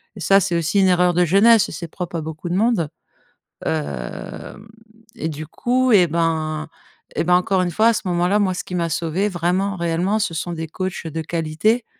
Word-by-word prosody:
et - - -10
ça, 195 +4 +4
c'est 185 -3 -1
aussi 170 +5 +1
une 190 - +5
erreur 180 -1 +3
de 175 +1 +3
jeunesse, 205 +6 +5
et - - -8
c'est 170 - -6
propre 175 +1 -6
à 165 - -1
beaucoup 160 +2 -6
de 175 - -1
monde, 210 -7 +1 0.8
hem 75 - -5 0.5
et 160 - -3
du 155 0 -6
coup, 250 - 0
et 180 -4 +6
ben 155 -1 -1 0.5
et - - +1
ben, 180 +1 +4
encore 185 +1 +2
une 175 - -1
fois, 220 +7 +3
à 230 - +3
ce - - -2
moment-là, 180 +3 +2
moi 195 -3 +1
ce 180 - -4
qui 180 - -5
m'a 170 -1 0
sauvé 170 +5 -1
vraiment, 185 +3 0
réellement, 170 +5 0
ce 210 -5 -1
sont 165 +2 -3
des 160 -1 -5
coachs 185 +1 -4
de 160 +1 -4
qualité 170 +9 0
175 Hz, 210 wpm, -21 LUFS, 160-195 Hz, 0.8 s, et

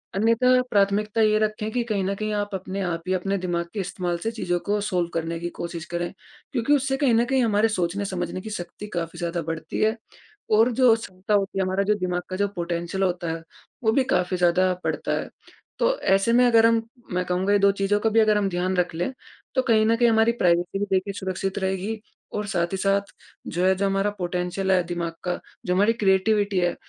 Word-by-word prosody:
अन्यथा 230 +5 +4
प्राथमिकता 210 +2 +2
ये 215 0 +4
रखें 215 0 -1
कि 245 - 0
कहीं 210 -4 -1
न 195 +1 0
कहीं 215 +1 -3
आप 205 0 -1
अपने 190 +1 -4
आप 170 -2 -2
ही 185 - +1
अपने 195 +2 0
दिमाग 175 -2 -2
के 210 - -4
इस्तेमाल 180 -2 -2
से 195 +7 -3
चीज़ों 175 -6 -1
को 205 +1 +1
सॉल्व 180 -4 0
करने 165 0 -2
की 175 +1 -3
कोशिश 170 -1 -5
करें। 175 0 -3 0.4
क्योंकि 270 +1 +1
उससे 270 -1 +1
कहीं 270 -4 +3
न 230 +1 +4
कहीं 260 0 +2
हमारे 215 0 +3
सोचने-समझने 185 -2 -2
की 220 - -7
शक्ति 205 +1 -7
काफ़ी 170 0 -3
ज़्यादा 170 0 -2
बढ़ती 160 -1 -4
है 220 +2 +3 0.6
और 235 +3 +5
जो 245 -1 +5
क्षमता 195 -2 -5
होती 195 -1 +1
है, - - +2
हमारा 190 +1 0
जो 210 +1 +2
दिमाग 180 -1 -1
का 185 - -3
जो 200 +1 +1
पोटेंशियल 175 +2 -2
होता 175 -3 -1
है। 165 0 -5 0.4
वो 220 - +4
भी 265 +4 +3
काफ़ी 180 0 +1
ज़्यादा 180 +1 +3
बढ़ता - - -2
है। - - -6 0.5
तो - - +2
ऐसे 195 +4 +2
में 250 +1 +5
अगर 230 -2 +5
हम 230 0 +4 0.3
मैं 180 0 0
कहूँगा 185 +3 +1
ये 205 - +4
2 200 0 +5
चीज़ों 200 +1 0
को 225 - +1
भी 225 - +4
अगर 215 -1 +4
हम 200 -1 +1
ध्यान 180 +1 -1
रख 180 -1 +1
लें। 175 +9 -1 0.4
तो 260 - +4
कहीं 220 -3 +3
न 230 +1 +3
कहीं 235 0 +4
हमारी 225 +1 +4
प्राइवेसी 175 +2 +2
भी 205 - 0
देखिए 190 +1 +1
सुरक्षित 190 +1 -3
रहेगी 190 +3 -2 0.4
और 210 0 -2
साथ 175 -2 -1
ही - - 0
साथ 195 +1 +2 0.5
जो 175 +2 -1
है, 190 0 +4
जो 200 +1 0
हमारा 195 +1 +1
पोटेंशियल 180 +2 -1
है 180 -2 +4
दिमाग 170 -1 -3
का, 180 -1 -2 0.3
जो 180 - +1
हमारी 205 +4 +4
क्रिएटिविटी 200 -1 +2
है। 175 -1 +1
195 Hz, 220 wpm, -24 LUFS, 180-215 Hz, 0.6 s, और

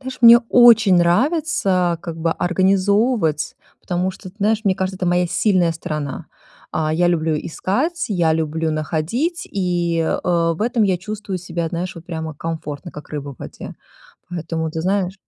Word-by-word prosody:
Знаешь, 260 -1 -7
мне 235 0 +10
очень 225 -6 +7
нравится, 185 - +2
как 170 -3 -6
бы, 165 0 0
организовывать, 190 - +1 0.2
потому 180 +1 -1
что, 185 0 -11
ты 200 - -34
знаешь, 215 +1 +2
мне 190 -2 +3
кажется, 190 0 -3
это 180 - -3
моя 175 0 +2
сильная 180 -2 +2
сторона. 150 -3 -5 0.5
А, 155 -1 0
я 175 +2 +2
люблю 160 -2 +1
искать, 265 - -2
я 170 -5 +2
люблю 160 0 -1
находить, 170 - -2
и, 175 -3 0
э, 160 - 0 0.4
в - - -13
этом 235 -1 +1
я 190 -3 +2
чувствую 205 0 -5
себя, 170 -2 -3
знаешь, 175 +2 -4
вот 170 0 -11
прямо 160 -3 -5
комфортно, 160 0 -6
как 150 - -11
рыба 145 -2 -5
в - - -33
воде, - - -9 0.5
поэтому, 165 -2 -3
ты 160 - -4
знаешь 190 0 0
175 Hz, 165 wpm, -20 LUFS, 160-200 Hz, 0.5 s, мне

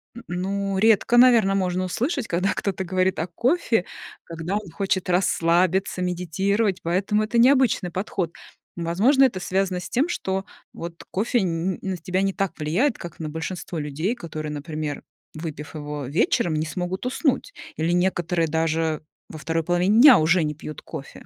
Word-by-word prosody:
н 235 - -10
н 180 +1 -3
ну, 195 +1 -2
редко, 220 +3 +4
наверно, 235 -6 +6
можно 185 -1 0
услышать, 250 - -2
когда 180 +3 0
кто-то 190 -1 -2
говорит 185 +1 0
о 165 - -1
кофе, 235 - +1 0.4
когда 165 +3 -4
он 210 -4 -4
хочет 190 -1 -1
расслабиться, 180 +1 +2
медитировать, 185 +3 0
поэтому 195 +5 +1
это 225 +2 -1
необычный 250 -7 +4
подход. 180 -2 -3 0.4
Возможно, 200 - +3
это 230 -8 0
связано 185 0 0
с - - -8
тем, 270 +7 +1
что 190 - -2 0.3
вот 170 0 -8
кофе 225 +5 +1
н 180 -1 -1
н - - -15
на 190 -2 -3
тебя 185 +3 -1
не 195 -1 0
так 195 -4 -2
влияет, 185 - +1
как 170 -2 -9
на 155 -1 -4
большинство 165 +2 -5
людей, 150 - -2
которые, 155 -7 -6
например, 150 0 -5 0.3
выпив 155 -1 -7
его 150 -2 -5
вечером, 155 +2 +1
не 155 - 0
смогут 180 +6 -4
уснуть, 270 - 0 0.2
или 160 +2 0
некоторые 175 -2 +1
даже 160 0 0 0.3
во 160 - -8
2 165 +1 -2
половине 180 +6 +2
дня 265 -5 +10
уже 165 +2 +3
не 150 - -1
пьют 155 -1 -8
кофе. - - -9
180 Hz, 165 wpm, -24 LUFS, 165-200 Hz, 0.4 s, дня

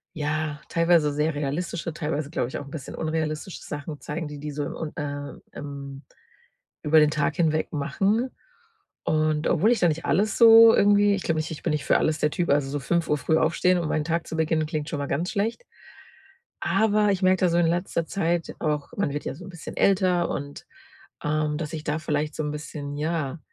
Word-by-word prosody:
ja 150 0 -2
teilweise 165 -3 +3
sehr 150 +2 0
realistische, 155 +4 -3
teilweise 150 -2 -3
glaube 150 - -1
ich 130 - -5
auch 145 - -8
'n 140 - -11
bisschen 145 -5 -7
unrealistische 155 +2 -3
Sachen 145 +1 -6
zeigen, 155 +1 -5
die 150 -1 -8
die 150 +1 -5
so 145 +1 -3
im - - -5
um 155 -2 -5
äh, 145 -1 -5 0.2
ähm, 140 -1 -7 0.8
über 155 +1 +5
den 150 -1 +5
Tag 150 0 0
hinweg 155 -2 +1
machen. 195 - 0 0.7
Und 155 0 +1
obwohl 185 +7 +3
ich 245 - +2
da 175 - +4
nicht 160 +1 -3
alles 200 +9 +1
so, 225 -1 +9
irgendwie 205 0 +4
ich 195 - -5
glaube 165 - 0
nicht, 155 - -3
ich 160 - -7
bin - - 0
nicht 150 -1 -1
für - - +4
alles 155 0 0
der 150 - +2
Typ. 175 +1 -1
Also, 140 -1 +2
so 145 - -2
5:00 155 +2 0
früh 145 +4 +1
aufstehen, 180 +3 +2
um 170 - -2
meinen 155 -1 0
Tag 165 +1 -1
zu - - -5
beginnen, 160 -1 +1
klingt 155 -2 -3
schon 150 - -3
mal 140 - -3
ganz 165 +7 -1
schlecht. 225 - -2 1.0
Aber, 210 +2 +2
ich 190 - -1
merke 185 0 +4
das 180 -2 +3
so 170 - +2
in 175 -1 +3
letzter 170 0 -1
Zeit 170 -1 -1
auch 150 -2 -2
man 180 -8 0
wird 145 - -4
ja - - -3
so 175 +5 -11
'n - - -10
bisschen 175 -3 -9
älter 185 -3 +3
und, 145 0 -5 0.6
ähm, 150 0 0
dass 155 0 -5
ich 155 -2 -5
da 150 +1 -1
vielleicht 150 -1 -2
so 155 - -2
'n 150 - -2
bisschen, 145 -1 -6
ja, 155 -2 -2
155 Hz, 215 wpm, -25 LUFS, 150-175 Hz, 1.0 s, so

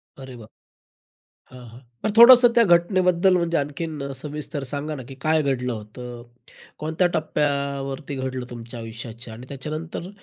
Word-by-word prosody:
अरे 130 -2 -10
बाप! 110 -2 -13 1.0
हां, 130 -1 -12
हां. 115 +3 -14 0.2
तर 215 - +2
थोडंसं 245 +1 +10
त्या 235 -1 +6
घटनेबद्दल, 180 +1 +3
म्हणजे 170 -1 0
आणखीन 145 -1 -4
सविस्तर 150 +1 -5
सांगा 150 +2 -3
ना, 135 - -7
की 135 - -9
काय 155 0 +2
घडलं 125 -3 -1
होतं, 120 +2 -8 0.6
कोणत्या 160 +4 0
टप्प्यावरती 140 -2 -2
घडलं 130 -1 -4
तुमच्या 120 0 -8
आयुष्याच्या 115 +1 -9
आणि 125 +3 -11
त्याच्यानंतर 155 +5 -6
140 Hz, 140 wpm, -23 LUFS, 125-160 Hz, 1.0 s, थोडंसं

